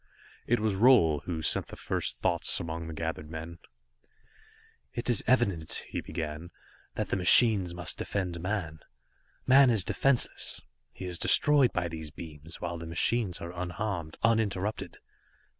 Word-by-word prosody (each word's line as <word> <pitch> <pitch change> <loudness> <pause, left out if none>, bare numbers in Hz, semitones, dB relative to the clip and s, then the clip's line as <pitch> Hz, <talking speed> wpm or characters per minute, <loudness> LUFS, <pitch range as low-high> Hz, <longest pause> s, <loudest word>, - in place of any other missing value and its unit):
It 120 0 +2
was 110 -1 0
Roal 95 - +4
who 80 -3 -4
sent - - +1
the - - -10
first - - -3
thoughts - - -1
among 80 0 -5
the 80 - -7
gathered 80 -1 -5
men. 80 +1 -8 1.4
"It 120 +1 0
is 115 - +3
evident," 100 -10 +1
he - - -4
began, 80 +1 -6 0.5
"that - - -3
the - - 0
machines 95 -1 +5
must 90 -1 -3
defend 90 -4 -3
man. 90 -5 -3 0.7
Man 135 0 +6
is 110 -6 +2
defenseless, 135 +6 +2 0.3
he 95 - -9
is 90 -2 -4
destroyed 145 -4 +4
by 90 -1 -2
these 80 -2 -7
beams, 80 +1 -10
while 85 -1 -5
the 85 - -8
machines 95 +3 +1
are 85 +1 -7
unharmed, 90 -2 -4
uninterrupted. 110 -3 -1
90 Hz, 145 wpm, -29 LUFS, 80-110 Hz, 1.4 s, Man